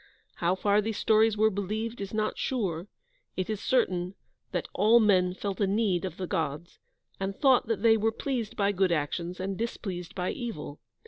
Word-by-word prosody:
How 175 +2 +1
far 205 +2 +2
these 220 0 -3
stories 220 0 +3
were 220 +1 +4
believed 215 +3 -3
is 195 - -5
not 215 0 -1
sure; 190 -9 -2 0.5
it 185 +3 -1
is 215 -1 -3
certain 185 -7 +1 0.4
that - - -2
"all 225 +3 +5
men 185 -4 +3
felt 200 +1 -4
a 200 - +3
need 195 -3 +1
of 185 - -6
the 185 - -3
Gods," 160 0 -3 0.4
and 195 0 -2
thought 265 -5 +4
that 225 -1 -1
they 225 -1 +6
were 220 +1 +1
pleased 235 -2 -3
by 200 0 +2
good 190 -2 +1
actions 170 +3 -2
and 195 +1 -2
displeased 190 -5 -5
by 180 -1 -1
evil. 155 - -6
200 Hz, 185 wpm, -28 LUFS, 180-220 Hz, 0.5 s, they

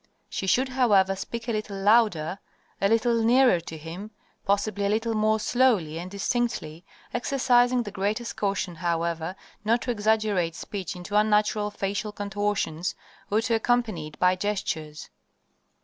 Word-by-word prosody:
She 190 - -4
should, 260 +7 +2
however, 205 -7 +3
speak 230 +4 -6
a - - 0
little 215 -2 -3
louder, 195 -5 +3 0.4
a 195 - +3
little 230 +1 +2
nearer 245 -4 +5
to 165 -1 -8
him, 165 +7 -8 0.4
possibly 200 0 +1
a - - 0
little 225 +2 0
more 215 0 +2
slowly 210 -11 +2
and 180 +2 -6
distinctly, 200 -5 -2 0.3
exercising 245 -1 +2
the 205 - -7
greatest 210 +4 -2
caution, 195 -3 -1
however, 170 0 -2 0.3
not 230 +3 +2
to 250 - -1
exaggerate 210 -6 +1
speech 190 -1 -5
into 180 +3 -6
unnatural 210 0 +2
facial 205 +1 -3
contortions, 205 -4 -2 0.3
or 215 +2 +2
to 230 0 -1
accompany 225 -8 0
it 155 - -13
by 180 0 +3
gestures. 165 -6 -3
205 Hz, 145 wpm, -26 LUFS, 185-230 Hz, 0.4 s, nearer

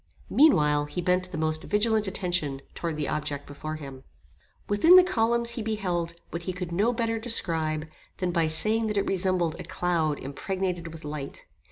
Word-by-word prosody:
Meanwhile 150 - +4
he 150 - -6
bent 180 +1 0
the 170 - -5
most 155 +1 -1
vigilant 215 +1 +1
attention 175 -8 -1
towards 165 -3 -4
the 150 - -2
object 145 -2 -3
before 155 +2 -6
him. 135 -3 -9 0.6
Within 205 - +6
the 370 - +9
columns 235 -7 +1
he 235 - -4
beheld 180 -6 -2 0.2
what 170 - -4
he 185 +2 -4
could 180 -1 -5
no 205 +7 +2
better 230 -1 -1
describe, 160 -9 0 0.3
than 180 -1 -1
by 165 -2 +1
saying 215 +8 +3
that 210 -1 -2
it 200 - +1
resembled 180 -3 0
a - - -5
cloud 165 -4 0
impregnated 180 +5 -3
with 160 -2 -11
light. 150 -2 -6
175 Hz, 175 wpm, -27 LUFS, 155-210 Hz, 0.6 s, the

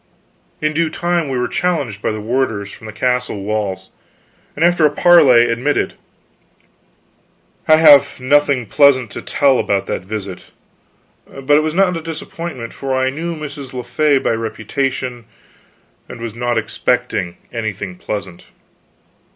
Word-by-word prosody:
In 155 0 0
due 165 +1 +1
time 170 -1 -1
we 130 - -2
were 125 - 0
challenged 160 - -2
by - - -1
the 110 - -4
warders, 110 -3 -2
from 110 - -11
the - - -6
castle 125 -3 -1
walls, 100 -3 -3 0.6
and 160 - +2
after 175 -2 +3
a 150 - +6
parley 145 -7 +6
admitted. 125 +6 0 1.7
I 155 - +7
have 150 -5 +6
nothing 140 -1 +2
pleasant 130 -1 +3
to - - -6
tell 135 -3 +2
about 100 -1 0
that - - -3
visit. 100 -1 -7 0.8
But 135 +2 0
it 150 - +5
was 155 +1 -2
not 185 -1 +3
a 165 - -4
disappointment, 160 -5 -6
for 135 -1 -3
I 130 0 +1
knew 165 +4 -4
Mrs. 145 -4 -8
le 125 - -4
Fay 150 0 +2
by - - 0
reputation, 120 +2 -3 0.8
and - - -9
was 115 -2 -5
not 120 0 -1
expecting 110 -4 -1 0.2
anything 100 -5 -4
pleasant. 95 -3 -6
130 Hz, 145 wpm, -17 LUFS, 110-150 Hz, 1.7 s, I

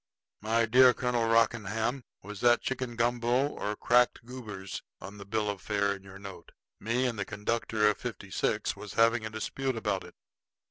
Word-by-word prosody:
My 115 +2 +2
dear 125 +2 +6
Colonel 120 -2 0
Rockingham, 115 +2 +1 0.2
was 105 +1 -8
that 120 -1 +4
chicken 130 -2 -3
gumbo 120 +3 +1
or 105 -6 -4
cracked 120 +1 +2
goobers 105 -7 -7 0.2
on 100 +1 -10
the 100 - -9
bill 105 +1 -1
of 100 -2 -3
fare 100 -1 0
in 100 - -10
your 95 0 -12
note? 95 -4 -11 0.3
Me 120 +4 0
and 120 -4 -2
the - - +1
conductor 105 +1 0
of 105 - +2
fifty - - -7
six - - 0
was 105 - -9
having 115 -1 +3
a - - -6
dispute 130 +4 -3
about 105 -4 -1
it." - - -13
115 Hz, 180 wpm, -29 LUFS, 105-120 Hz, 0.3 s, dear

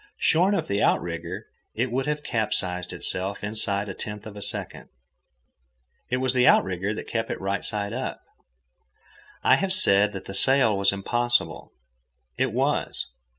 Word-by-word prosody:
Shorn 185 +5 +3
of - - -2
the 100 +1 -1
outrigger, - - -1 0.3
it 120 +2 -1
would 135 +3 -1
have 150 0 -2
capsized 90 -6 0
of - - -6
itself 95 +2 +1
inside 105 -1 -1
a 95 - -5
tenth 105 +1 -6
of 110 -1 -9
a 105 - -8
second. - - -3 1.2
It 125 - 0
was 130 0 +1
the 125 -1 +3
outrigger 95 +2 +3
that - - -7
kept 115 -1 -2
it - - -4
right 100 +1 -2
side 105 -1 -2
up. 130 +2 -4 1.2
I - - +5
have 195 -1 -1
said 100 - +4
that 95 - -7
the 95 - -7
sail 125 +1 +3
was 100 0 +3
impossible. 120 +5 0 0.6
It - - 0
was. - - -1
105 Hz, 160 wpm, -25 LUFS, 100-125 Hz, 1.2 s, I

